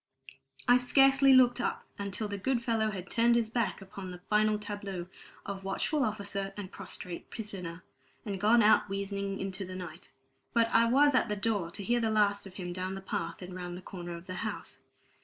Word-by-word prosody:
I 245 - +7
scarcely 270 +2 +5
looked 250 -1 +6
up - - -2 0.2
until 200 +2 -3
the 200 -1 -4
good 240 +3 0
fellow 225 -3 +1
had 190 -3 -6
turned 235 +3 +3
his 230 -2 +1
back 230 -4 -1
upon 195 -1 -8
the 180 - -7
final 210 +3 +2
tableau 205 -4 -5 0.4
of 195 -1 -5
watchful 270 +9 0
officer 200 -3 -2
and 195 -3 -6
prostrate 175 -2 -7
prisoner 185 -6 -6 0.4
and 200 -3 -4
gone 230 +2 +5
out 210 -1 +5
wheezing 200 0 -3
into 195 0 -4
the 185 0 -7
night. 180 -2 -8 0.4
But 230 -1 +3
I 230 - +5
was 280 +5 +5
at 255 - +3
the 210 - 0
door 200 -4 0
to 200 - -6
hear 240 +4 +2
the 225 -1 +1
last 205 -2 +2
of 185 - -13
him 175 -2 -5
down 185 +1 -3
the 195 - -6
path 170 -2 -4
and 180 0 -8
round 180 -1 -5
the - - -9
corner 175 -2 -7
of 170 +1 -10
the 185 - -6
house. 215 -2 -5
200 Hz, 200 wpm, -31 LUFS, 185-230 Hz, 0.4 s, I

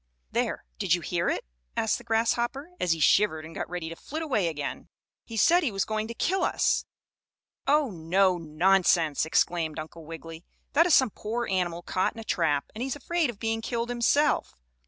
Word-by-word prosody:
"There, - - -1
did - - +3
you - - -5
hear - - -1
it?" - - -2 0.3
asked 220 -2 +1
the - - -13
grasshopper, 235 +6 0
as 175 - +2
he 165 - -5
shivered 160 -1 +3
and 165 - -10
got - - -4
ready 175 -2 -4
to 165 - -6
flit 315 - -6
away 225 - +1
again, 150 -3 -4 0.4
"he 230 - -7
said 345 - +5
he 290 -9 0
was 195 -1 -1
going 215 0 -2
to 235 - -7
kill 375 +7 0
us." - - +1 0.8
"Oh, 290 -3 +3
no! 180 +2 +2
Nonsense!" 165 -1 +2
exclaimed 160 -1 +1
Uncle 160 +1 -7
Wiggily. 165 +1 -9 0.3
"That 330 +4 +5
is 340 - +6
some 260 -5 +4
poor 230 +5 -3
animal 175 -2 -1
caught 185 - 0
in - - -8
a - - -6
trap, 160 -9 +1
and 220 - -7
he's 265 +1 -2
afraid 330 +1 0
of 235 - -6
being 225 +1 -1
killed 235 +1 -2
himself. 250 +5 +2
210 Hz, 195 wpm, -27 LUFS, 165-240 Hz, 0.8 s, is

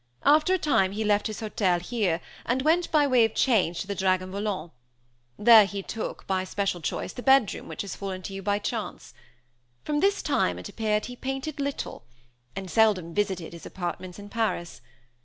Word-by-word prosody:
After 305 +5 +5
a - - +1
time 195 - +2
he 215 +2 -2
left 210 -1 +2
his 215 +1 -6
hotel 195 -5 +1
here, 180 -3 -1 0.2
and 255 +2 0
went, 335 +3 +2
by 300 -2 +4
way 255 -4 +4
of 225 -1 0
change, 190 -9 +2
to - - -6
the 200 - -2
Dragon 185 -1 0
Volant; 200 -4 -3 0.7
there 220 -1 +8
he 200 -1 -5
took, 225 - -5
by 190 -1 0
special 190 -1 -2
choice, 150 - -3
the 245 - -7
bedroom 265 -4 +3
which - - -5
has 200 - -6
fallen 190 -2 -5
to 195 - -6
you 195 - -5
by 205 +1 +1
chance. 205 - -5 0.7
From 295 -1 -1
this 400 +3 +2
time, - - +1
it - - -7
appeared, 215 -1 -1
he 250 - -7
painted 270 +4 -4
little; 280 - -4 0.5
and 190 -2 -6
seldom 205 -7 +3
visited 190 -5 -1
his 170 - -9
apartments 180 0 -5
in 205 0 -9
Paris. 210 - -2
205 Hz, 190 wpm, -26 LUFS, 185-245 Hz, 0.7 s, there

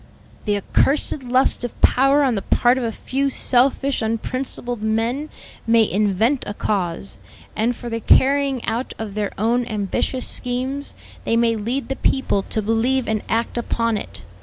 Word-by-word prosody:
"The 205 -2 +1
accursed 275 +8 +1
lust 255 0 +1
of 245 - -5
power 275 +3 +4
on 260 -3 +2
the 200 - -1
part 245 +6 +3
of - - -3
a 230 - -1
few 275 +5 -1
selfish, 270 +1 +1
unprincipled 240 +1 -3
men, 230 +7 -1 0.4
may 225 -1 +5
invent 215 +6 +1
a 205 - -4
cause, 170 - -2 0.4
and 235 +3 +1
for 240 - -8
the 230 -1 -2
carrying 275 +2 +3
out 230 +3 -2
of 220 -3 -5
their 210 -1 -2
own 235 +4 +1
ambitious 215 +4 -1
schemes, 260 +3 -2 0.3
they 230 - +1
may 230 -1 +3
lead 235 +6 -3
the 270 - -3
people 265 -7 +1
to 215 +2 -3
believe 235 +4 +1
and 215 -1 0
act 230 +1 0
upon 230 -1 0
it. 100 - -7
235 Hz, 160 wpm, -21 LUFS, 220-260 Hz, 0.4 s, may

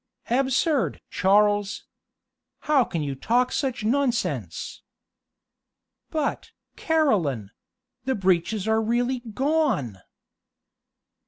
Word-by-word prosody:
"Absurd! 270 +2 +1
Charles. 205 +1 +2 0.8
How 295 -4 +3
can 165 -8 -3
you 140 -1 -3
talk 240 - +1
such 260 -6 -2
nonsense?" 250 0 -1 1.3
"But, 310 -3 -2 0.3
Caroline 185 - +1 0.5
the 265 0 0
breeches 190 +2 +1
are 220 0 +2
really 240 +3 0
gone." 240 - -1
235 Hz, 80 wpm, -25 LUFS, 195-270 Hz, 1.3 s, How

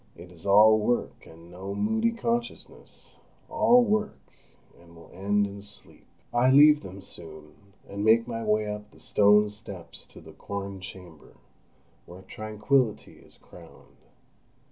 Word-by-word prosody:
It 85 +1 -13
is 85 +1 -11
all 110 +2 +6
work, 120 +3 -2
and 85 +1 -16
no 95 +3 -7
moody 220 - 0
consciousness—all 235 +1 -2
work, 215 -1 -1 0.6
and 85 0 -19
will 85 - -16
end 100 +2 0
in 100 0 -8
sleep. 105 0 -10 0.3
I 120 +2 +3
leave 150 +2 +6
them 95 +1 -10
soon, 80 -5 -9 0.3
and 100 +1 -5
make 115 +2 +4
my 115 -1 -5
way 105 0 +1
up 105 0 -6
the - - -21
stone 105 0 +3
steps 100 -5 -10
to - - -15
the - - -14
"corn 100 -1 -7
chamber," 90 -4 -13 0.7
where 90 +2 -13
tranquillity 110 +4 -2
is - - -18
crowned. - - -17
105 Hz, 140 wpm, -26 LUFS, 95-115 Hz, 0.7 s, all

